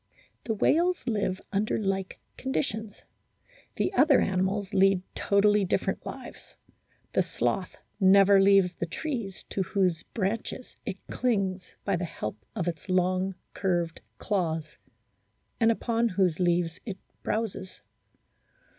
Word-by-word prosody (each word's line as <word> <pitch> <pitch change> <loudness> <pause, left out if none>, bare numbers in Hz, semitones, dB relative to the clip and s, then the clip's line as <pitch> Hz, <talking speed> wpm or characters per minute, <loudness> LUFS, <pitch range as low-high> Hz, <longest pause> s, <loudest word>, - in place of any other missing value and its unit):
The 225 - -1
whales 345 - +2
live 205 -5 0
under 205 +2 +1
like 195 -2 -2 0.2
conditions; 220 -5 -3 0.7
the 375 - 0
other 290 -6 +5
animals 195 +2 0
lead 195 -1 +4
totally 205 +1 +3
different 185 - -1
lives. - - -9 0.6
The - - +4
sloth - - -1 0.2
never 195 0 +6
leaves 195 -2 +5
the 170 - -4
trees 230 - -4
to 195 - -1
whose 185 -3 +1
branches 225 +6 -4
it 190 - -3
clings 195 -7 -1
by 200 -3 +1
the 175 - -2
help 110 -9 -6
of 175 - -2
its 170 +2 -4
long 185 +1 +1 0.2
curved 175 -4 -1 0.2
claws, 165 -6 -2 0.8
and 225 0 +5
upon 230 0 +1
whose 185 -4 +1
leaves 175 -2 +1
it 200 -5 -5 0.2
browses. 215 -4 -3
195 Hz, 120 wpm, -28 LUFS, 185-215 Hz, 0.8 s, never